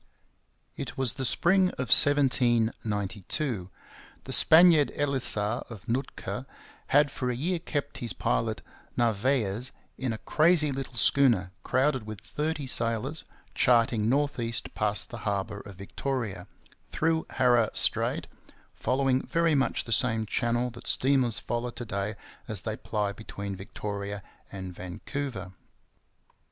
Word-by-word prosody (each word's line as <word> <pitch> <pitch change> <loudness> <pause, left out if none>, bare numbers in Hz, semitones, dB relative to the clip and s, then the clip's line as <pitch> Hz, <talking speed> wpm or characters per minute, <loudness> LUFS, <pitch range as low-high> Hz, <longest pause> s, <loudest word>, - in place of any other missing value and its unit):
It - - -6
was 130 -3 +2
the 130 0 -3
spring 185 +8 +3
of 130 - +3
1792. 115 - +2 0.5
The - - -2
Spaniard 160 -2 +6
Elisa 125 -6 0
of 115 -1 -10
Nootka 125 +4 -3 0.4
had 145 0 +4
for 125 -3 -3
a 125 - -1
year 170 +7 -1
kept 145 -4 -4
his 120 - -4
pilot - - -1 0.3
Narvaez, 120 0 +1 0.3
in 130 -3 -1
a 110 - -3
crazy 155 +3 +3
little 135 -1 -5
schooner 115 -7 +3
crowded 130 -3 +1
with 110 -2 -6
thirty 150 - -3
sailors, 120 +5 -1 0.3
charting 115 -3 +3
north 140 +1 +1
east 115 0 -3
past 105 -1 -1
the 120 - -6
harbour 100 0 -2
of 100 -1 -11
Victoria, 100 -1 -4 0.4
through 160 0 0
Haro 120 -3 +3
Strait, - - +4 0.5
following 130 0 +1
very 165 -1 +1
much 135 -2 +1
the 115 - -9
same 110 -1 +1
channel 120 +3 0
that 120 +1 -10
steamers 130 -4 +3
follow 120 +1 -2
to 120 0 -6
day 100 0 -3 0.3
as 105 -3 -4
they 110 -1 -3
ply 105 -3 -2
between 100 -2 -6
Victoria 100 +1 -5 0.3
and 95 -2 -7
Vancouver. 95 +3 -6
120 Hz, 130 wpm, -28 LUFS, 105-135 Hz, 0.5 s, Spaniard